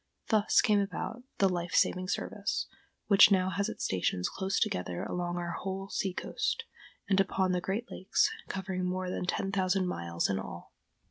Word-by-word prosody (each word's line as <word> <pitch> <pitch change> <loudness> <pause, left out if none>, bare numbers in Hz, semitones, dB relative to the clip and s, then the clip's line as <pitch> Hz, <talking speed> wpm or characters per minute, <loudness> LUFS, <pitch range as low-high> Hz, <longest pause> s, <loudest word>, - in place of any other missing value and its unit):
Thus 215 -1 +4
came 210 -2 +3
about 210 +4 -3 0.2
the 195 - +4
Life 175 -2 -2
Saving 185 0 +3
Service, - - -2 0.4
which 200 -1 +8
now 190 -2 +3
has 200 +4 0
its - - -6
stations 90 -1 0
close 195 0 -1
together 90 -1 -1
along 175 0 -2
our 175 0 -3
whole 195 +2 -4
sea 195 - -1
coast, 465 - -2 0.4
and 195 -1 +3
upon 190 -1 +2
the 180 -1 0
great 200 +6 -3
lakes, 185 - +2 0.2
covering 190 -1 -3
more 185 0 -2
than 180 - -3
ten 195 +2 -1
thousand 190 -1 +1
miles 85 - -1
in 95 -1 0
all. 85 -2 -8
185 Hz, 175 wpm, -31 LUFS, 175-195 Hz, 0.4 s, which